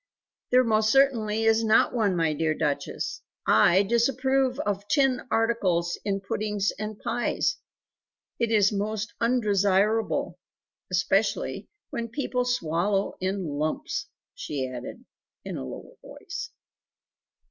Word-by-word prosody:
"There 255 +1 +5
most 220 -2 +2
certainly 225 -6 +3
is 225 0 +3
not 220 0 +4
one, 210 -6 +1
my 165 -2 +1
dear 155 +1 0
Duchess. 150 -3 -2 0.2
I 190 +3 +5
disapprove 255 +4 +1
of 205 -4 -3
tin 270 0 +2
articles 185 -8 +1
in 195 -1 -1
puddings 205 +1 -1
and 215 0 -4
pies. 240 - -1 0.8
It 235 -1 +1
is 210 -2 +4
most 215 +2 -3
undesirable 215 -2 +1 0.5
(especially 195 - 0 0.2
when 235 0 -3
people 250 +1 -2
swallow 195 -3 0
in 190 0 -1
lumps!)" 155 - -2 0.3
she 145 - -4
added 130 - -8 0.4
in - - -5
a - - -4
lower - - -9
voice. 350 +7 -7
215 Hz, 115 wpm, -26 LUFS, 190-240 Hz, 0.8 s, There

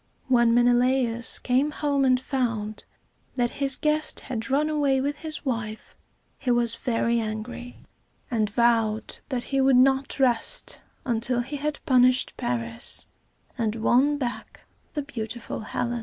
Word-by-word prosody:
] - - -38
When 235 -1 +4
Menelaus 245 -1 +2
came 260 +4 +1
home 285 -2 0
and 255 -1 +3
found 230 -6 -3 0.5
that 240 -2 0
his 270 -1 +6
guest 305 0 0
had 235 -1 -5
run 285 +3 +2
away 290 -3 +1
with 285 +2 -2
his 310 0 -5
wife, 225 -4 -4 0.4
he 260 - -3
was 240 -1 +3
very 230 0 0
angry, 225 +3 -6 0.5
and 215 -3 +1
vowed 225 -1 +1
that 250 -3 -2
he 270 - +3
would 265 -1 +4
not 270 +2 +2
rest 260 - +2 0.2
until 240 0 0
he 270 +4 -5
had 295 0 -4
punished 255 -2 +4
Paris 115 -1 -1 0.5
and 220 -2 0
won 260 +6 +2
back 250 -4 -5 0.3
the 295 - -2
beautiful 235 -3 -6
Helen. 240 +2 -3
245 Hz, 140 wpm, -25 LUFS, 230-270 Hz, 0.5 s, his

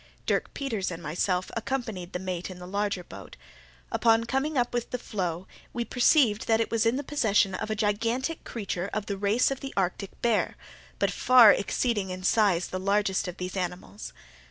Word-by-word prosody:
Dirk - - 0
Peters 225 -9 -2
and 170 -1 -7
myself 180 +4 -1
accompanied 220 -7 -3
the - - -2
mate 180 -1 -4
in 185 - -8
the 180 - -9
larger 200 0 -2
boat. - - -11 0.5
Upon 225 0 +3
coming 270 +5 -1
up 245 -1 +1
with 240 -1 -2
the 250 - -2
floe, 185 -6 -3 0.3
we 240 -1 -2
perceived 245 -4 +3
that 225 0 +3
it 230 - -1
was 230 0 +2
in 230 - +2
the 285 - -2
possession 220 -9 +2
of 210 - -4
a 215 - 0
gigantic 230 +8 -1
creature 200 -4 -4
of 215 -1 -2
the 200 - -3
race 205 +7 +2
of 270 - -3
the 270 - -7
Arctic 190 +1 -2
bear, 235 -3 +1 0.4
but - - +1
far 250 -4 +7
exceeding 205 -1 -1
in 185 0 -6
size 185 -3 +2
the 185 - -3
largest 200 0 +1
of 180 - -6
these 180 +1 -5
animals. 180 +2 -5
210 Hz, 190 wpm, -27 LUFS, 185-235 Hz, 0.5 s, far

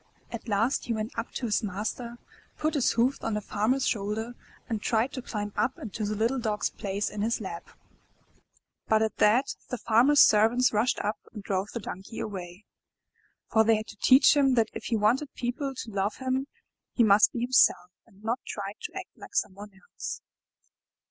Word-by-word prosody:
At 235 0 -7
last 225 +5 +1
he 235 - -1
went 215 +1 -4
up 230 - -3
to 250 - -3
his 215 - +1
master, 215 +4 -4 0.4
put 310 +1 0
his 285 -5 +2
hoofs 245 +4 +1
on 225 - -2
the - - 0
Farmer* 215 +4 0
s 270 - -1
shoulder, 220 +2 -2 0.3
and 220 -3 -3
tried 230 +4 0
to 260 - -4
climb 205 -4 -5
up 225 +5 0
into 215 0 -6
the 210 +1 -2
little 230 +5 0
Dog's 215 -3 -1
place 200 +1 -3
in 210 - -5
his 225 +2 0
lap. 185 -5 -7 1.2
But 220 0 +3
at 220 - -2
that, 240 +6 +3 0.2
the 250 - -3
Farmer's 245 +7 +4
servants 225 +4 +5
rushed 220 +4 +2
up 210 +2 -2
and 210 -3 -9
drove 195 0 -1
the 235 - -4
Donkey 195 0 -8
away, 185 -1 -6 0.9
for 220 - +5
they 225 0 +4
had 215 0 -4
to 215 - -11
teach 260 +7 +6
him 270 -3 +4
that 225 -2 +2
if - - -7
he 235 - 0
want 215 +5 +3
ed 290 -3 -8
people 265 +3 -3
to 235 - -7
love 200 +1 -1
him, 260 +1 -2 0.5
he 240 - +3
must 205 -1 +6
be 235 - -4
himself, 240 -7 +3 0.2
and 195 +2 -22
not 230 +3 -1
try 200 -1 -5
to - - -6
act - - -8
like - - -13
someone 205 - -2
else. 195 0 -8
220 Hz, 195 wpm, -28 LUFS, 210-245 Hz, 1.2 s, teach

